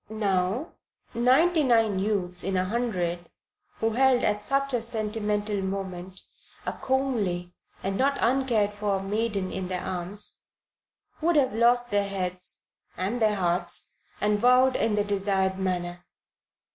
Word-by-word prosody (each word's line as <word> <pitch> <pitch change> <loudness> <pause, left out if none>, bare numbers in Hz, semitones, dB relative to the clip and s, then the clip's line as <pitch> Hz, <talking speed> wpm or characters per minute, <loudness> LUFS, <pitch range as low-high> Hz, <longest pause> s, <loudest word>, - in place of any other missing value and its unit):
Now, 205 - 0 0.4
ninety 275 +9 +4
nine 225 -7 +3
youths 190 -3 -1
in 190 0 -1
a 185 - +1
hundred 185 -6 -2 0.5
who 225 0 0
held, 255 +1 +3
at 210 0 +1
such 275 +2 0
a 245 - +1
sentimental 210 -2 -1
moment, 190 -1 -5 0.4
a - - -2
comely 210 -10 -1 0.3
and 195 0 -2
not 275 +1 +2
uncared 235 -5 +2
for 205 -2 -1
maiden 205 -2 -1
in 190 -1 -4
their 185 0 -3
arms, 185 +3 -4 0.8
would 340 +1 +2
have 270 -3 +3
lost 240 +1 +3
their 200 -1 +1
heads 185 -1 -5 0.3
(and 205 +6 -2
their 215 -1 +3
hearts) 175 -2 -1 0.2
and 210 0 +1
vowed 250 +2 +5
in 225 -2 +1
the 205 - +2
desired 195 -2 0
manner. 175 -2 -2
210 Hz, 135 wpm, -27 LUFS, 190-240 Hz, 0.8 s, vowed